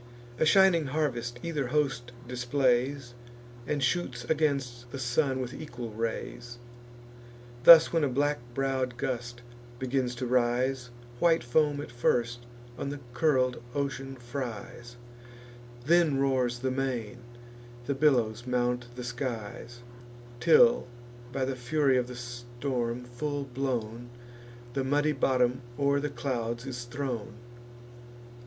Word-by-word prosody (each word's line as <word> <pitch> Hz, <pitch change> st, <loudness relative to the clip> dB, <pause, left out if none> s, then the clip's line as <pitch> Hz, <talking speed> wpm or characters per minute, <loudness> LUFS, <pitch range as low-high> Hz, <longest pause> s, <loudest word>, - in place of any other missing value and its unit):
A 155 Hz, -, +4 dB
shining 180 Hz, -4 st, +5 dB
harvest 125 Hz, -5 st, -1 dB
either 150 Hz, -6 st, -2 dB
host 135 Hz, -3 st, 0 dB, 0.2 s
displays, 125 Hz, +1 st, 0 dB, 0.5 s
And 145 Hz, -2 st, 0 dB
shoots 130 Hz, -4 st, 0 dB
against 135 Hz, -5 st, -1 dB
the -, -, -5 dB
sun 130 Hz, +2 st, +1 dB
with 125 Hz, 0 st, -4 dB
equal 120 Hz, -6 st, -7 dB
rays. 115 Hz, +2 st, -4 dB, 1.1 s
Thus, 165 Hz, -1 st, +10 dB
when 165 Hz, -2 st, +2 dB
a 145 Hz, -, +2 dB
black 145 Hz, +2 st, +1 dB, 0.2 s
brow'd 130 Hz, -2 st, -1 dB
gust 120 Hz, -1 st, -4 dB, 0.3 s
begins 130 Hz, -1 st, -1 dB
to 125 Hz, +1 st, -3 dB
rise, 125 Hz, +1 st, +1 dB, 0.3 s
White 165 Hz, -3 st, +4 dB
foam 145 Hz, +4 st, +2 dB
at 145 Hz, -, -8 dB
first 120 Hz, 0 st, 0 dB, 0.3 s
on -, -, -2 dB
the 145 Hz, 0 st, -5 dB
curl'd 130 Hz, -3 st, +2 dB
ocean 135 Hz, -1 st, -3 dB
fries; 120 Hz, -1 st, -7 dB, 0.9 s
Then 165 Hz, -2 st, +4 dB
roars 130 Hz, -3 st, +1 dB
the 130 Hz, +1 st, -1 dB
main, 125 Hz, -3 st, -2 dB, 0.7 s
the 140 Hz, -, 0 dB
billows 125 Hz, -5 st, +2 dB
mount 125 Hz, -1 st, 0 dB
the 125 Hz, -, -6 dB
skies; 120 Hz, -1 st, -5 dB, 0.6 s
Till, 235 Hz, -, +5 dB, 0.4 s
by 130 Hz, +1 st, -1 dB
the 135 Hz, 0 st, -2 dB
fury 135 Hz, +2 st, +2 dB
of 125 Hz, -1 st, +1 dB
the 125 Hz, -, -8 dB
storm 120 Hz, 0 st, -4 dB
full 140 Hz, +4 st, -3 dB
blown, 120 Hz, -3 st, -3 dB, 0.6 s
The 135 Hz, -, 0 dB
muddy 145 Hz, +3 st, +2 dB
bottom 130 Hz, -2 st, +1 dB, 0.2 s
o'er 140 Hz, 0 st, +2 dB
the 145 Hz, +1 st, -2 dB
clouds 120 Hz, -2 st, -3 dB
is 125 Hz, -2 st, -5 dB
thrown. 120 Hz, -3 st, -4 dB
130 Hz, 120 wpm, -29 LUFS, 120-140 Hz, 1.1 s, Thus